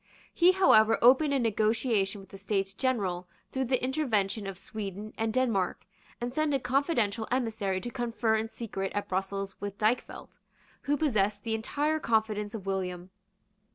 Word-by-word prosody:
He 355 +2 +5
however 225 - +5
opened 265 +5 +5
a 280 - +2
negotiation 220 -3 +1
with 195 - -17
the 195 - -10
States 195 -2 -1
General 195 -8 -1 0.2
through 265 0 -1
the 255 0 0
intervention 225 -7 0
of 195 -2 -6
Sweden 205 +1 -6
and 225 0 -1
Denmark, 225 -7 0 0.3
and 240 +1 -4
sent 310 0 +1
a - - +1
confidential 250 -5 0
emissary 220 -6 -1
to 240 - -5
confer 235 -2 0
in 220 +1 -1
secret 195 -5 -4
at 205 - -2
Brussels 195 +1 -3
with 205 0 -5
Dykvelt, 215 +4 -2 0.5
who 290 - +3
possessed 210 -9 +1
the 225 - -2
entire 295 +8 0
confidence 220 -4 0
of 200 -4 -7
William. 185 -2 -3
220 Hz, 155 wpm, -29 LUFS, 195-255 Hz, 0.5 s, He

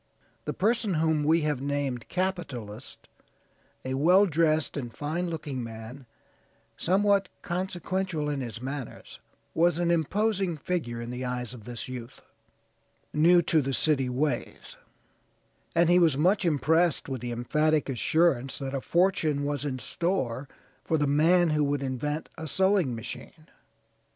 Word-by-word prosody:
The - - -2
person 215 -2 +1
whom 160 -1 +2
we 160 +3 +3
have 150 -3 -1
named 140 -4 -2
capitalist, 140 - -4 0.8
a 130 - -2
well 180 +9 +5
dressed 160 -3 +1
and 120 -4 -4
fine 160 +7 -3
looking 150 -6 -4
man, 115 +3 -9 0.7
somewhat 195 +1 +2
consequential 185 -2 -2
in 145 -2 -2
his 120 -1 -6
manners, 135 -2 -7 0.3
was 170 0 +3
an 170 0 +1
imposing 190 +2 0
figure 140 -8 -3
in 120 +1 -5
the 125 +1 -5
eyes 125 -1 -3
of 115 -4 -11
this 120 +3 -5
youth, 125 -1 -8 0.9
new 170 +3 +5
to 150 -4 +2
city 135 -3 +2
ways, 130 0 -2 1.0
and 170 0 +4
he 175 +1 +5
was 160 -6 +4
much 185 +6 +3
impressed 160 +2 +2
with 130 -4 -4
the 120 0 -4
emphatic 150 +6 +1
assurance 135 0 +1
that 135 -1 -5
a 135 - -2
fortune 165 -5 +1
was 145 0 -2
in 135 -3 -2
store 135 -2 -2 0.4
for 160 - +1
the 150 - +1
man 165 +4 +4
who 150 -1 +2
would 145 -1 0
invent 145 +4 -3
a 160 - -5
sewing 190 -5 +2
machine. 155 +7 -9
150 Hz, 140 wpm, -28 LUFS, 130-175 Hz, 1.0 s, well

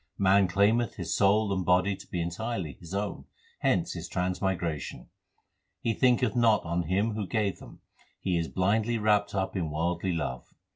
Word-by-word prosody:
Man 100 0 +4
claimeth 105 +5 +2
his 85 -3 -3
soul 100 +1 +3
and 95 -1 -1
body 90 +2 +3
to 95 - -14
be 85 -2 -2
entirely 90 - -3
his 85 -1 -12
own; 100 0 -3 0.3
hence - - +1
his - - -6
transmigration. 90 -3 -2 0.7
He 115 - 0
thinketh 125 -2 +2
not 115 -3 +4
on 85 0 -1
Him 100 +6 +1
who 105 -2 -3
gave 105 -3 -1
them; - - -13 0.4
he 95 -2 -1
is 85 -1 0
blindly 110 +5 +1
wrapped 105 -2 +2
up 95 0 -1
in 85 -5 -1
worldly 85 +4 -1
love. 65 -6 -4
95 Hz, 165 wpm, -28 LUFS, 85-105 Hz, 0.7 s, Man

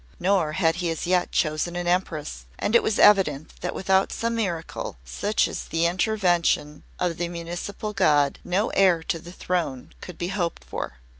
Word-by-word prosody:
Nor 180 -4 +2
had 165 -1 +2
he 175 -1 -1
as 165 - -3
yet 180 0 +1
chosen 155 +2 0
an 175 0 -2
Empress, 155 - -2
and 210 - -1
it 235 - +7
was 215 - 0
evident 160 -8 +4
that - - -3
without 190 0 +2
some 230 0 -2
miracle, 180 - -3
such 205 - 0
as - - -5
the 165 +1 0
intervention 175 -5 +1 0.2
of 175 -2 -1
the 175 - -1
Municipal 175 +5 -5
God, 145 -8 +3
no 190 +5 0
heir 180 -4 +4
to 165 - -2
the 170 +2 -11
throne 170 -8 -3
could 180 - -9
be 175 - -3
hoped 175 -4 -2
for. - - -6
175 Hz, 175 wpm, -25 LUFS, 160-190 Hz, 0.2 s, it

